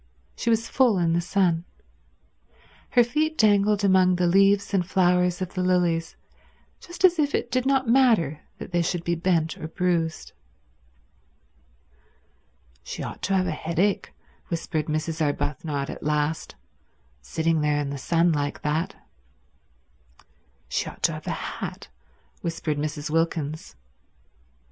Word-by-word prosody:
She 235 - -2
was 225 0 +2
full 250 -6 +3
in 170 -2 +1
the 170 - +2
sun. 175 -2 +1 1.3
Her 245 - +5
feet 305 +6 -1
dangled 205 -1 +3
among 185 -2 +4
the 175 0 +1
leaves 195 +3 +3
and 190 -2 +3
flowers 180 0 +2
of 185 - -7
the 185 - -2
lilies 175 -3 +1 0.6
just 350 +2 -1
as 355 -2 +4
if 290 -1 +2
it 240 - -2
did 255 +1 0
not 270 -2 +2
matter 225 - +3 0.2
that - - -9
they 175 0 +2
should 170 0 -2
be 170 - 0
bent 165 -2 0
or 155 - -5
bruised. 165 -2 -1 2.5
"She - - -6
ought - - -7
to 195 - 0
have 185 -1 +2
a 180 - -1
headache," 170 +6 -1 0.4
whispered 160 -2 -3
Mrs. 155 +1 -2
Arbuthnot 145 -1 -2
at - - -9
last, 150 - -1 0.7
"sitting 160 - 0
there 150 -1 +1
in 140 -1 -2
the 140 - -5
sun 170 +4 +2
like 145 -2 -2
that." 155 +3 -1 1.7
"She - - -2
ought - - -15
to - - +4
have - - -9
a - - -4
hat," - - -6 0.5
whispered 165 -3 -2
Mrs. 150 0 -3
Wilkins. 160 - -1
175 Hz, 140 wpm, -25 LUFS, 155-200 Hz, 2.5 s, Her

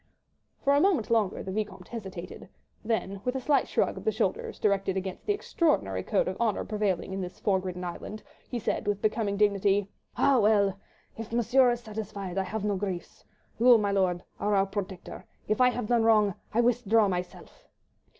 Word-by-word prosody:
For 280 - +4
a 285 - +4
moment 335 - +2
longer 215 -5 +1
the 190 - -5
Vicomte 195 -3 -4
hesitated, 185 -6 -8 0.3
then 205 -3 -2
with 250 +1 -1
a - - 0
slight 280 +2 +2
shrug - - 0
of - - -7
the 440 - +2
shoulders 470 0 -2
directed 195 -2 +1
against 190 -1 -5
the 415 - +3
extraordinary 300 - 0
code 95 - 0
of 185 +5 -4
honour 220 -4 0
prevailing 205 -4 -1
in 195 - -3
this 180 -1 -7
fog 190 -2 +1
ridden 180 0 -5
island, 180 +4 -6 0.3
he 245 - -3
said 215 - -2
with 205 -1 0
becoming 210 -1 0
dignity,— 200 -1 +2 0.3
"Ah, 275 -3 +4
well! 205 -3 +3 0.4
if 225 -1 -7
Monsieur 240 +2 +4
is 240 0 -1
satisfied, 205 -4 -5
I - - +1
have 215 +1 -4
no 205 -2 0
griefs. 185 -3 -5 0.4
You, 240 0 +7
mi'lor', 195 -4 +1 0.2
are 205 0 +1
our 195 0 +3
protector. 195 -2 -6 0.2
If 215 +3 +1
I 250 - +7
have 245 -2 -3
done 235 +1 +2
wrong, 215 -3 +4 0.2
I 235 - +3
withdraw 230 -3 +3
myself." 180 -1 -6
210 Hz, 185 wpm, -28 LUFS, 190-230 Hz, 0.4 s, You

